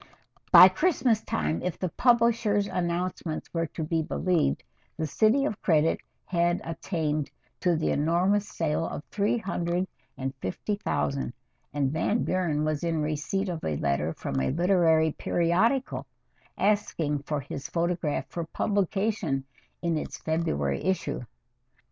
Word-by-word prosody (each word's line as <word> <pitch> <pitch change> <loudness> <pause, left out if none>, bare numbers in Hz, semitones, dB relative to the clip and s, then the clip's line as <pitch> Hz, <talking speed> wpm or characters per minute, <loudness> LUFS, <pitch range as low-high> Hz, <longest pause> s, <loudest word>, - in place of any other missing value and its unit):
By 185 - +11
Christmas 240 - +2
time, 80 0 -1
if 180 - -3
the 185 - -2
publishers' 230 -3 +3
announcements 175 -3 -3
were 165 -1 0
to 160 - -5
be 160 +1 0
believed, 160 - 0 0.3
"The 160 - -1
City 220 - +3
of 215 -7 -3
Credit" 160 -2 +3 0.3
had 175 -1 +1
attained 160 -3 -2 0.3
to 175 -2 +2
the 160 - 0
enormous 180 +7 +2
sale 160 -1 -1
of 145 - -6
three 210 +3 +1
hundred 180 -3 -1 0.3
and 135 0 -3
fifty 130 - -3
thousand, 140 -9 -1 0.4
and 140 -2 0
Van 205 +8 +1
Buren 165 -5 0
was 155 0 -1
in 165 -2 0
receipt 155 +6 -1
of 170 -3 -4
a 75 -2 -1
letter 70 +3 0
from 70 -3 -3
a 65 - +1
literary 165 -2 +3
periodical 190 - +1 0.5
asking 170 -8 +1
for 145 +1 -3
his 135 0 -6
photograph 170 -3 -1
for 170 -1 -4
publication 195 -5 0 0.4
in 165 -2 +1
its - - -6
February 70 - -1
issue. 190 -5 -1
170 Hz, 135 wpm, -27 LUFS, 150-195 Hz, 0.5 s, By